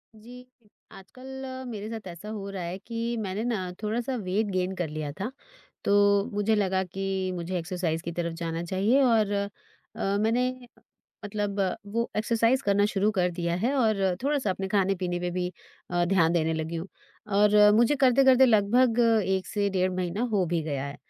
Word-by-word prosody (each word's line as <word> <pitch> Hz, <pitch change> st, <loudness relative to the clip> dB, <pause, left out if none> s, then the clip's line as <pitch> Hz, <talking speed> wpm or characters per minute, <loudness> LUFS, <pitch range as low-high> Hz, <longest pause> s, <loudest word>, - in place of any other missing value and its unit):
जी, 245 Hz, +3 st, -13 dB, 0.5 s
आजकल 260 Hz, +7 st, -10 dB
अ, 260 Hz, 0 st, -6 dB
मेरे 215 Hz, -3 st, -6 dB
साथ 220 Hz, -4 st, -7 dB
ऐसा 175 Hz, +5 st, -10 dB
हो 205 Hz, -2 st, -5 dB
रहा 190 Hz, -2 st, -5 dB
है 170 Hz, +2 st, -4 dB
कि 230 Hz, +3 st, -4 dB
मैंने 205 Hz, 0 st, -3 dB
ना 210 Hz, -7 st, -2 dB
थोड़ा-सा 235 Hz, +4 st, -1 dB
वेट 195 Hz, +4 st, 0 dB
गेन 185 Hz, 0 st, -1 dB
कर 175 Hz, -3 st, -2 dB
लिया 150 Hz, -1 st, -4 dB
था, 210 Hz, +6 st, -3 dB, 0.5 s
तो 200 Hz, 0 st, +4 dB
मुझे 205 Hz, +2 st, +1 dB
लगा 190 Hz, -2 st, +1 dB
कि 195 Hz, +2 st, -5 dB, 0.3 s
मुझे 175 Hz, +1 st, -3 dB
एक्सरसाइज़ 170 Hz, -2 st, -2 dB
की 170 Hz, -, -5 dB
तरफ़ 170 Hz, -1 st, -2 dB
जाना 165 Hz, 0 st, -3 dB
चाहिए 200 Hz, +9 st, +2 dB
और 225 Hz, -5 st, +3 dB
अ, 200 Hz, 0 st, 0 dB, 0.7 s
मैंने 250 Hz, +3 st, 0 dB, 0.6 s
मतलब 205 Hz, -1 st, -2 dB, 0.3 s
वो 230 Hz, +3 st, -2 dB
एक्सरसाइज़ 230 Hz, +4 st, +2 dB
करना 200 Hz, -2 st, +3 dB
शुरू 205 Hz, +1 st, +2 dB
कर 180 Hz, -1 st, +2 dB
दिया 170 Hz, -1 st, -2 dB
है 235 Hz, +9 st, 0 dB
और 220 Hz, -5 st, +2 dB, 0.2 s
थोड़ा-सा 275 Hz, -6 st, 0 dB
अपने 190 Hz, +1 st, -3 dB
खाने-पीने 190 Hz, -3 st, 0 dB
पे 180 Hz, 0 st, -2 dB
भी 180 Hz, 0 st, -2 dB, 0.4 s
अ, 175 Hz, 0 st, +1 dB
ध्यान 175 Hz, -2 st, +3 dB
देने 160 Hz, -2 st, +1 dB
लगी 160 Hz, +1 st, -3 dB
हूँ 165 Hz, +4 st, -5 dB, 0.5 s
और 210 Hz, 0 st, +6 dB
मुझे 235 Hz, +6 st, +4 dB
करते-करते 265 Hz, 0 st, +5 dB
लगभग 230 Hz, +2 st, +3 dB, 0.3 s
1 190 Hz, -1 st, 0 dB
से 205 Hz, -2 st, 0 dB
डेढ़ 185 Hz, -1 st, +1 dB
महीना 185 Hz, +4 st, -2 dB
हो 200 Hz, -4 st, +2 dB
भी 165 Hz, -, +1 dB
गया 140 Hz, -3 st, -3 dB
है। 140 Hz, 0 st, -7 dB
200 Hz, 175 wpm, -27 LUFS, 180-230 Hz, 0.7 s, और